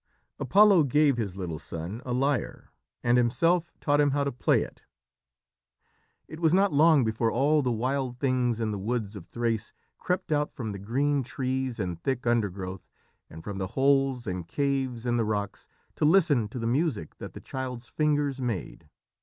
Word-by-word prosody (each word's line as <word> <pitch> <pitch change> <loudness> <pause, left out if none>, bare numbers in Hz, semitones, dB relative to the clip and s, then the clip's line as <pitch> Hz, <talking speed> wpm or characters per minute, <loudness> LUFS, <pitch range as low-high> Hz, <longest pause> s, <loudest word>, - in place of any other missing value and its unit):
Apollo 200 -6 +5
gave 140 0 +3
his 100 -5 -3
little 85 -5 -4
son 85 +8 -6
a 125 - -5
lyre, 135 0 -1 0.3
and 120 +1 +4
himself 165 +8 +2
taught 145 0 +2
him 145 - +3
how 140 +1 +1
to 140 - -1
play 125 - +2
it. - - -12 1.5
It 155 - -9
was 165 0 +3
not 195 -2 +3
long 155 -1 +5
before 115 +1 0
all 145 +4 +3
the 125 -3 0
wild 125 +2 -1
things 125 -3 0
in 110 -2 -1
the 100 - -3
woods 110 0 -3
of 90 -4 -9
Thrace 115 +1 -2 0.3
crept 180 -2 -2
out 150 0 +1
from 110 -4 -5
the 100 - -6
green 135 +8 0
trees 130 -1 -3
and 90 -4 -3
thick 130 +2 -2
undergrowth, 95 -6 -2 0.4
and 80 +1 -11
from 100 -1 -5
the 95 - -2
holes 135 -2 +2
and 90 -4 -4
caves 135 - -1
in 120 -1 +1
the 115 - +2
rocks, 105 -2 -3 0.3
to - - -2
listen 155 - +4
to 115 - -8
the 115 - -3
music 120 - -1
that - - -8
the - - -8
child's 125 -2 -6
fingers 145 -2 0
made. 120 -7 -4
125 Hz, 180 wpm, -27 LUFS, 110-145 Hz, 1.5 s, Apollo